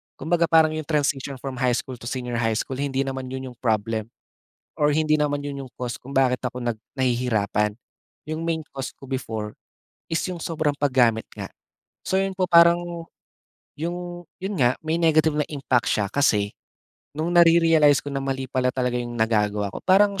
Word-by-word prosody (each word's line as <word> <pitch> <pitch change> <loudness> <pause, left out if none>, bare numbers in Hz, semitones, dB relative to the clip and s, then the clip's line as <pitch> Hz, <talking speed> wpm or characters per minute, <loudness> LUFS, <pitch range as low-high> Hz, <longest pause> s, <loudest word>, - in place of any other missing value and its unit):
Kumbaga 170 0 +1
parang 160 -1 +5
iyong 155 -2 -5
transition 140 -3 0
from 130 0 -6
high 125 -2 +2
school 130 0 -5
to 120 - -8
senior 125 -2 -3
high 115 -1 +1
school 130 +4 -3
hindi 135 -1 0
naman 135 -1 -4
iyon 130 0 -6
iyong 120 - -19
problem, 110 -1 -1 0.7
or 150 -2 +2
hindi 155 +1 +2
naman 150 -1 +1
iyon 140 -1 -4
iyong 130 -2 -11
cause 125 -1 -5
kung 130 - -12
bakit 130 -2 +2
ako 125 -1 -4
nag 120 -3 -3 0.2
nahihirapan. 110 -5 0 0.5
Iyong 155 +2 -4
main 165 -2 -2
cause 135 -1 -6
ko - - -12
before 110 -5 -4 0.5
is 165 - -1
iyong 180 -2 -4
sobrang 155 -2 -1
paggamit 125 -5 +2
nga. - - -7 0.5
So 190 - 0
iyon 195 0 -1
po 185 -1 -1
parang 170 0 +4 0.7
iyong 175 +2 -5 0.2
iyon 195 +2 -3
nga, 125 -4 +4
may 160 +1 -1
negative 160 -2 +3
na 150 - +1
impact 135 -6 0
siya 100 -2 0
kasi, 105 -7 +2 0.7
noong 160 +3 -1
nare-realize 165 -4 +5
ko 145 - -5
na 135 - -2
mali 135 -1 -2
pala 130 -1 0
talaga 125 -1 -1
iyong 120 0 -5
nagagawa 105 -3 +1
ko, - - -6
parang 200 +1 +4
135 Hz, 180 wpm, -24 LUFS, 125-160 Hz, 0.7 s, parang